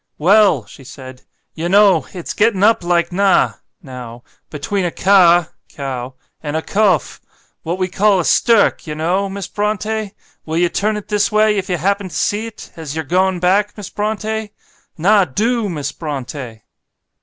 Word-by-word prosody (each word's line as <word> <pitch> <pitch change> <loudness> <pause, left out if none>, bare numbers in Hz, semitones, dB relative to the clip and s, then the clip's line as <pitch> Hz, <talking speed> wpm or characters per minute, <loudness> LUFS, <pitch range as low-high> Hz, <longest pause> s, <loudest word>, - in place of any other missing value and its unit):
'Well!' 185 - +4
she 135 - -15
said, 130 -1 -11 0.3
'Yah 165 +1 -4
know, 190 -7 +4
it's 175 -2 -6
getting 210 -3 +2
up 220 -3 +4
like 170 0 +1
nah 195 +1 +2 0.3
(now), 125 -4 -9 0.3
between 155 +7 -3
a 175 - 0
cah 175 -3 +4 0.2
(cow) 130 -2 -6 0.3
and 145 0 -4
a 160 - -3
cofe 195 - +1 0.4
what 170 +3 -3
we 185 -1 -1
call 200 +1 +2
a 170 - -1
stirk, 230 -7 +3
yah 150 - -4
know, 180 +5 0
Miss 195 0 -6
Brontë; 215 0 -2 0.3
will 160 +1 -3
yah 175 0 +2
turn 210 +3 -1
it 210 0 -9
this 205 -1 +1
way 215 0 +3
if 195 -1 -3
yah 180 - 0
happen 200 +3 -1
to 160 - -10
see't, 215 +6 -3
as 160 -3 -7
yah're 160 -1 -3
going 185 +3 +1
back, 195 +4 +1
Miss 205 - -8
Brontë; 215 +1 -3 0.5
nah 200 +5 +4
DO, 215 - -1
Miss 145 -5 -4
Brontë.'" 135 -6 -6
185 Hz, 165 wpm, -17 LUFS, 155-205 Hz, 0.5 s, Well